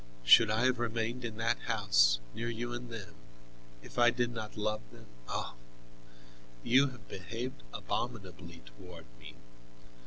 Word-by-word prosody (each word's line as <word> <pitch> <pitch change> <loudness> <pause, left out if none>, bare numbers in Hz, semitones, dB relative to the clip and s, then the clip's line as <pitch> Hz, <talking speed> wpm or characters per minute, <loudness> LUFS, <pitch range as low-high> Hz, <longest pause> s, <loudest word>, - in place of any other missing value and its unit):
Should 85 - +8
I 110 +3 +2
have 130 -2 +2
remained 115 +1 -2
in 115 -2 -5
that 115 +1 +1
house, - - +4
near 120 +1 -3
you 120 +1 -4
and 120 0 -6
them, 115 -4 -8 0.7
if - - -7
I 120 0 +7
did 120 0 0
not 110 -2 -6
love 105 0 -1
them? - - -14 0.2
Oh! - - -3 1.1
You 135 +4 +5
have 125 -6 -11
behaved 115 - -6
abominably - - -5
toward 80 +8 -12
me. - - -11
115 Hz, 145 wpm, -32 LUFS, 105-120 Hz, 1.1 s, Should